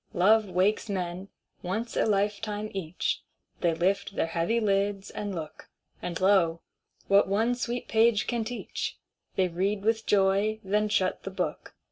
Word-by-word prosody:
Love 210 +3 +4
wakes 190 +5 +1
men, 185 -1 -3 0.3
once 215 +6 -3
a - - +2
lifetime 210 +1 -1
each; 180 -3 -2 0.4
They 170 -2 +1
lift 195 +3 0
their - - +1
heavy 170 +8 0
lids, 200 -2 0
and 205 -2 -4
look; 160 -2 -8 0.3
And, 170 -2 -4
lo, 185 -4 +3 0.5
what 200 +1 +5
one 220 +5 +2
sweet 245 0 -3
page 225 -1 +3
can 235 -2 -1
teach, 240 +2 -4 0.4
They 190 -1 +3
read 195 +4 -1
with 225 +1 +1
joy, 200 +2 +3
then 210 +2 +1
shut 185 -3 +1
the - - -5
book. 190 - -4
200 Hz, 150 wpm, -28 LUFS, 185-215 Hz, 0.5 s, what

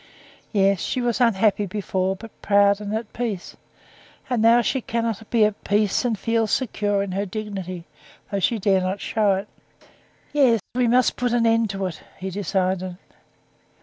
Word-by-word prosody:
"Yes, 195 -2 +3
she 255 - -2
was 245 0 0
unhappy 210 -3 +3
before, 190 -1 -1
but 225 +3 -11
proud 200 0 +4
and 205 0 -5
at 220 -1 -5
peace; 225 -7 -4 0.8
and 240 -3 +1
now 230 +2 +6
she 265 +3 0
cannot 230 -2 -3
be 225 -3 +4
at 210 -1 -3
peace 205 0 +1
and 235 -3 0
feel 230 +1 0
secure 205 -4 0
in 200 - -5
her 195 +2 -1
dignity, 190 -4 -5 0.5
though 200 - 0
she 230 +4 +1
does 195 -2 +2
not 185 +2 -2
show 210 -2 +1
it. 195 +2 -4 0.9
Yes, 260 -6 +4
we 250 0 +2
must 250 +2 +3
put 245 -1 0
an 235 -1 +2
end 225 -1 +3
to 195 -1 -3
it," 175 -4 -5 0.2
he 190 0 -5
decided. 185 -1 -1
210 Hz, 170 wpm, -23 LUFS, 195-230 Hz, 0.9 s, now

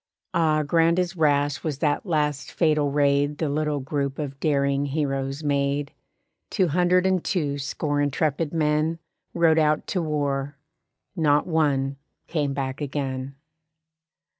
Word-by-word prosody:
Ah, 155 -2 +2
grand 165 +3 +3
as 180 0 0
rash 145 -3 +1
was 150 -4 -2
that 150 +6 0
last 150 -5 -1
fatal 150 -3 +2
raid 145 0 +2
The 155 -2 -1
little 150 0 -1
group 140 0 -2
of 140 -3 -5
daring 140 -1 +1
heroes 135 0 -2
made. 140 0 0 0.6
Two 185 -5 +1
hundred 180 +3 +3
and 185 -2 +2
two 145 -6 -1
score 145 +1 -1
intrepid 145 +2 0
men 155 0 +1 0.4
Rode 165 -2 +4
out 155 -1 +2
to 185 - -1
war; 145 -2 -2 0.6
not 150 -4 +3
one 140 -5 +1 0.3
came 150 -4 -1
back 135 0 -3
again. 135 -2 -3
145 Hz, 135 wpm, -24 LUFS, 140-160 Hz, 0.6 s, Rode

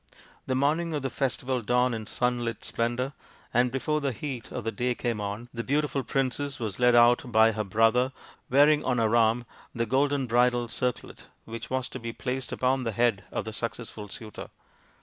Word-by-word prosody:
The 130 - 0
morning 155 +5 +1
of 145 - -3
the 135 - -2
festival 130 -2 -1
dawned 125 +2 +2
in 110 -2 -5
sunlit 120 -2 -1
splendour, 120 +4 -1 0.4
and 125 +1 +3
before 150 +4 -1
the 140 -2 0
heat 130 0 -6
of 125 - -4
the 115 - -1
day 120 +3 -1
came 115 -3 -2
on 105 +4 -4
the 115 -1 -3
beautiful 145 +1 0
princess 135 +2 -1
was 110 -4 -3
led 125 -1 +5
out 120 +1 +5
by 110 0 +6
her 110 0 -2
brother, 115 +5 +3 0.4
wearing 145 +3 +5
on 125 -1 +1
her 115 0 +2
arm 115 +1 +3 0.3
the 115 0 0
golden 135 +3 +1
bridal 120 0 +2
circlet 125 +1 -3 0.2
which 115 0 -7
was 130 -1 -1
to 130 - -7
be 115 -1 -5
placed 125 +2 -4
upon 130 +1 +1
the 115 -2 -2
head 110 -3 +1
of - - -3
the 110 - -5
successful 115 -2 -5
suitor. 110 0 -8
120 Hz, 190 wpm, -27 LUFS, 115-130 Hz, 0.4 s, by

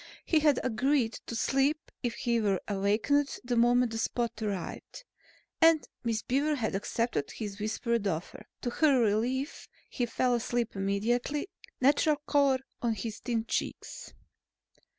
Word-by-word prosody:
He 320 - +3
had 295 -3 +3
agreed 255 0 +1
to 235 - -4
sleep 275 +6 +1
if 240 -2 -2
he 235 -1 0
were 200 -3 +1
awakened 215 +9 +1
the 245 0 -1
moment 240 0 +3
Spot 235 0 -1
arrived, 205 - -5 0.6
and 325 -1 +5 0.2
Miss 225 -2 -1
Beaver 290 +4 +1
had 225 -7 -2
accepted 205 - -1
his 205 -2 -6
whispered 215 +1 -1
offer. 170 -2 -4
To 245 - -2
her 280 -1 +4
relief, 240 +6 0 0.2
he 245 -2 -1
fell 250 +2 +1
asleep 240 -1 -1
immediately, 235 - -1 0.3
natural 290 +3 +4
color 280 -2 +3 0.2
on 230 -2 +1
his 215 +1 -5
thin 230 -2 -2
cheeks. - - -4
240 Hz, 135 wpm, -30 LUFS, 220-275 Hz, 0.6 s, and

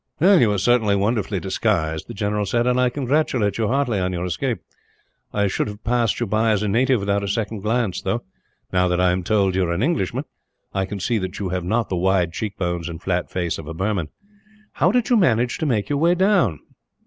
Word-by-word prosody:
"You 170 - +5
are 100 - 0
certainly 110 0 +3
wonderfully 105 -1 0
disguised," 85 -5 -1
the 120 - -8
general 105 0 -1
said; 120 +4 +1
"and 125 0 +2
I 125 - +3
congratulate 125 -6 0
you 110 - +1
heartily 125 -4 +1
on 90 0 -1
your 90 0 -2
escape. 115 +7 -1 0.7
I 100 0 +1
should 95 - -1
have 105 +1 -8
passed 120 -2 +1
you 120 - 0
by 110 +2 +1
as 105 -1 +1
a - - 0
native 120 +3 +2
without 100 0 0
a - - -2
second 105 +1 -2
glance 105 -2 -1
though, 120 +1 -2 0.5
now 90 0 +3
that 90 0 0
I 90 0 +4
am 90 +1 -1
told 100 0 +1
that 95 - 0
you 95 - +2
are 85 - -2
an 90 +6 -1
Englishman, 150 - 0 0.5
I 95 -1 0
can 100 +1 -5
see 115 +4 0
that 95 0 -5
you 100 -2 -3
have 90 -1 -2
not 115 +6 0
the 90 - -1
wide 90 -2 +1
cheekbones 90 -5 -3
and 80 -1 -7
flat 90 0 -2
face 85 -3 -2
of 75 - -9
a 80 - -6
Burman. 95 -3 -1 0.6
How - - +2
did 245 0 +1
you 240 - +6
manage 120 - +2
to 160 - -1
make 110 -6 0
your 145 -1 -1
way 170 +3 +3
down?" 185 - +2
105 Hz, 230 wpm, -22 LUFS, 95-120 Hz, 0.7 s, you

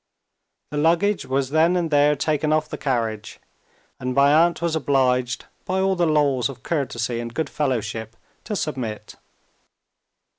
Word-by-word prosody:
The 150 - -3
luggage 175 +6 +2
was 135 0 -1
then 160 +3 +3
and 170 -3 -1
there 145 0 +4
taken 150 +1 0
off 155 0 +1
the - - -4
carriage; 115 -6 -2 0.6
and 125 0 -3
my 140 +1 +5
aunt 170 +2 +4
was 170 -1 -1
obliged, 130 -4 +1 0.2
by 185 +1 -1
all 190 0 +2
the 175 -2 +1
laws 145 -4 +2
of 130 -2 -10
courtesy 120 -6 -2
and 120 0 -5
good 160 - -2
fellowship, 115 -5 -2 0.3
to 210 - -3
submit. 130 - -4
145 Hz, 150 wpm, -23 LUFS, 125-160 Hz, 0.6 s, my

